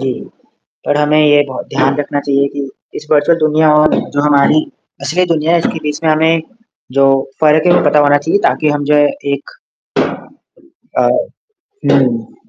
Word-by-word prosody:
जी। 135 -1 -2 0.7
पर 145 - 0
हमें 150 +1 +2
ये 145 -1 +4
बहो 130 - -6
ध्यान 135 +1 +1
रखना 145 0 -3
चाहिए 140 0 0
कि 140 -1 -5 0.3
इस 150 - -16
वर्चुअल 155 +2 +3
दुनिया 155 0 +2
और 150 0 +3 0.2
जो 145 - 0
हमारी 150 +1 +3 0.4
असली 165 +6 0
दुनिया 160 +1 -1
है 170 - +3
इसके 165 - -3
बीच 150 -1 -3
में 160 - +2
हमें 160 +1 +2 0.6
जो 135 - +5 0.3
फ़र्क 155 +1 +3
है, 175 - +5
वो - - -1
पता 150 - +3
होना 145 0 +4
चाहिए 160 +7 -1
ताकि 155 - 0
हम 145 - -4
जो 150 - +4
है 145 0 +4 0.3
एक 140 0 -7 1.5
अ, - - +3 0.9
हुँ। 120 -5 0
150 Hz, 175 wpm, -13 LUFS, 140-155 Hz, 1.5 s, जो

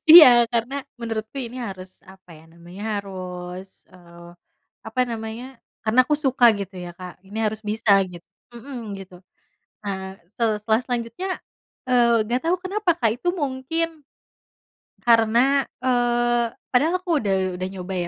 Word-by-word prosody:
iya. 320 -5 +12 0.2
Karena 235 +3 -1 0.2
menurutku 225 0 -5
ini 240 +1 -7
harus, 190 -5 -8
apa 190 -1 -17
ya 155 - -18
namanya, 170 +4 -12
harus, 185 -2 -6 0.3
eee, 170 -1 -14 0.6
apa 225 +3 -2
namanya, 225 +1 -5 0.4
karena 220 +3 +1
aku 300 - +2
suka, 265 -4 +2
gitu 195 -1 -6
ya 175 0 -6
Kak. 180 0 -10
Ini 205 +3 -7
harus 215 0 0
bisa, 215 +1 0 0.2
git 175 -1 -11 0.3
mhm, 235 -4 -7
gitu. 185 -2 -11 0.6
Nah, 190 -1 -5 0.2
sel 220 -3 +1
setelah 220 +2 +2
selanjutnya, 245 +9 -3 0.6
eee, 235 -2 +4
nggak 245 +3 0
tau 340 +2 +3
kenapa 385 0 0
Kak, 230 - +3
itu 350 - -1
mungkin, 310 +1 -3 1.0
karena, 240 +4 +4 0.2
eee, 240 -1 +2 0.2
padahal 295 +7 +3
aku 335 -5 +1
udah 200 -4 +1 0.3
udah 185 - -2
nyoba, 190 0 -6
225 Hz, 140 wpm, -23 LUFS, 190-255 Hz, 1.0 s, iya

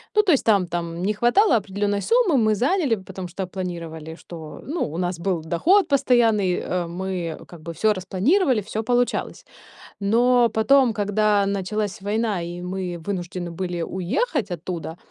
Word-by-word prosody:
Ну, 425 - +7
то 370 - +3
есть 280 - +3
там 200 -5 +3
там 170 0 -4
не 210 - +1
хватало 240 - +4
определенной 205 0 -1
суммы, 455 - +3
мы 215 -2 +3
заняли. 275 - +1
Потому 190 -2 -8
что 185 +1 -5
планировали, 165 -4 -6
что, 160 -3 -10
ну, 320 +5 -3
у - - -4
нас 180 -1 -1
был 180 -2 -1
доход 310 - +3
постоянный, 230 -9 +3
э, 175 -1 -2
мы 175 -2 -4
как 170 -3 -13
бы 170 +1 -7
всё 215 +5 +2
распланировали, 215 - +1
всё 215 +2 -4
получалось. 245 +1 -1 0.5
Но 235 +3 +3
потом, 240 +2 +4
когда 205 -1 +2
началась 200 +1 -2
война, 210 -1 -1
и 175 +1 -6
мы 180 -1 -4
вынуждены 175 -1 -4
были 175 0 -3
уехать 210 - -1
оттуда. 165 -1 -5
195 Hz, 160 wpm, -23 LUFS, 175-230 Hz, 0.5 s, Ну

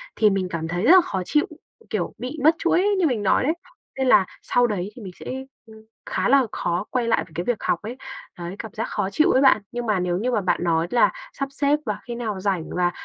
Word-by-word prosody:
thì 215 - +4
mình 195 -2 -1
cảm 165 -2 -3
thấy 175 +3 -2
rất 260 - +6
là 375 0 +9
khó 190 - -3
chịu. 300 - +2 0.4
Kiểu, - - -2
bị 255 +5 -6
mất 315 +2 +6
chuỗi 345 +2 +2 0.2
như 345 - +3
mình 230 -7 -1
nói 195 - +3
đấy, 300 +5 +2 0.4
nên 265 - 0
là 195 - +6 0.2
sau 245 0 +2
đấy 200 -3 -3
thì 245 - -10
mình 190 -3 -8
sẽ, - - -12 0.4
ưm, 220 -1 -15 0.2
khá - - -1
là 275 -1 +5
khó 175 +4 -2
quay 245 -2 -1
lại 230 - +2
về - - -21
cái 175 - -2
việc 240 +3 0
học 170 - +1
ấy, 235 +5 -7 0.4
đấy, 175 +2 -6
cảm 220 -3 -7
giác 225 - -3
khó 190 - -1
chịu 305 +10 +3
ấy 260 - +4
bạn. 265 -6 +5
Nhưng 240 0 -4
mà 210 -4 +1
nếu 180 -1 0
như 240 +6 -1
mà 225 - +1
bạn 185 -1 0
nói 165 -1 +1
là 240 - +4 0.2
sắp 275 0 -3
xếp 285 +1 +1
và 210 -2 -2
khi 240 - -4
nào 220 -5 -3
rảnh, 185 -4 -1
và 175 0 +2
220 Hz, 260 wpm, -23 LUFS, 185-255 Hz, 0.4 s, là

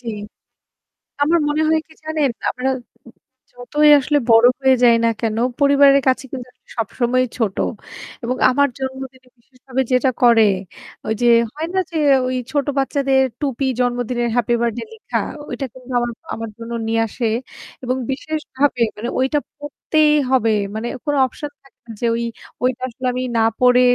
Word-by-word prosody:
জি। 235 - -8 1.1
আমার 325 +4 +3
মনে 305 +1 +1
হয় 315 0 +3
কি 320 - -19
জানেন, 310 -4 0 0.2
আমরা 255 +1 -2 0.8
যতই 295 +5 +2
আসলে 290 +2 +1
বড় 225 +1 +7
হয়ে 265 -1 +5
যাই 235 -1 +6
না - - +4
কেন, 220 -2 -1 0.2
পরিবারের 280 0 +6
কাছে 260 +1 +1
কিন্তু 250 -2 -6
আসলে - - -28
সবসময়ই 245 +3 0
ছোট। 215 -5 -1 0.7
এবং 250 +2 -1
আমার 285 +2 +3
জন্মদিনে 265 -1 -7
বিশেষভাবে 260 +2 -4
যেটা 255 +1 +3
করে, 235 -2 +6 0.7
ঐযে 220 +2 0 0.3
হয় 315 +2 -4
না - - +1
যে 335 - -6 0.3
ঐ - - -1 0.2
ছোট 285 -1 0
বাচ্চাদের 270 -1 +2 0.2
টুপি 275 -2 -1
জন্মদিনের 245 -1 0
Happy 240 0 +2
Birthday 235 - -2
লেখা, 445 - -3 0.3
ঐটা 275 - -4
কিন্তু 255 0 -11
আমার 240 0 -1 0.2
আমার 225 0 -6
জন্য 230 0 -7 0.2
নিয়ে 225 0 +1
আসে 235 +3 -3 0.6
এবং 255 +1 0
বিশেষভাবে 280 -2 -1
মানে 225 +3 -4
ঐটা 265 +3 +1 0.2
পরতেই 300 +1 +1 0.2
হবে। 230 -4 +3 0.2
মানে 220 +2 -3 0.2
কোন 290 -2 0
option 290 +3 -7
থাকে 275 - -25
না - - -13
যে 240 - 0
ঐ - - 0 0.5
ঐটা 255 -1 0
আসলে 255 +2 -6
আমি 250 +1 -3
না 225 - +3 0.2
পরে 250 0 +5
255 Hz, 160 wpm, -19 LUFS, 240-280 Hz, 1.1 s, বড়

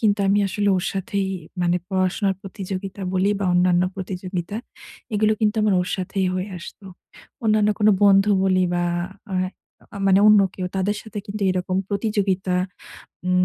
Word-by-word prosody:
কিন্তু 205 -2 +2
আমি 200 - +4
আসলে 205 +1 0
ওর 180 - -2
সাথেই 195 0 -1 0.4
মানে 175 0 +2
পড়াশোনার 190 +1 +1
প্রতিযোগিতা 195 0 -6
বলি 190 +2 +2
বা - - 0
অন্যান্য 180 0 +3
প্রতিযোগিতা, 185 +1 -4 0.6
এগুলো 215 +1 +3
কিন্তু 215 0 +2
আমার 210 -3 +3
ওর 180 - -2
সাথেই 190 +1 -1
হয়ে 185 +2 -2
আসত। 170 - -11 0.6
অন্যান্য 215 -1 +3
কোন 210 - +4
বন্ধু 195 0 +6 0.2
বলি 185 -1 +3
বা 175 - +1 0.5
আ - - -1 0.6
আ - - -7
মানে 190 0 +5
অন্য 210 -1 +7
কেউ 185 -1 -3
তাদের 205 +2 0
সাথে 220 -1 -7
কিন্তু 205 0 -5
এরকম 185 0 -1
প্রতিযোগিতা 200 -3 0 0.7
উম 180 0 +3
195 Hz, 155 wpm, -22 LUFS, 185-205 Hz, 0.7 s, অন্য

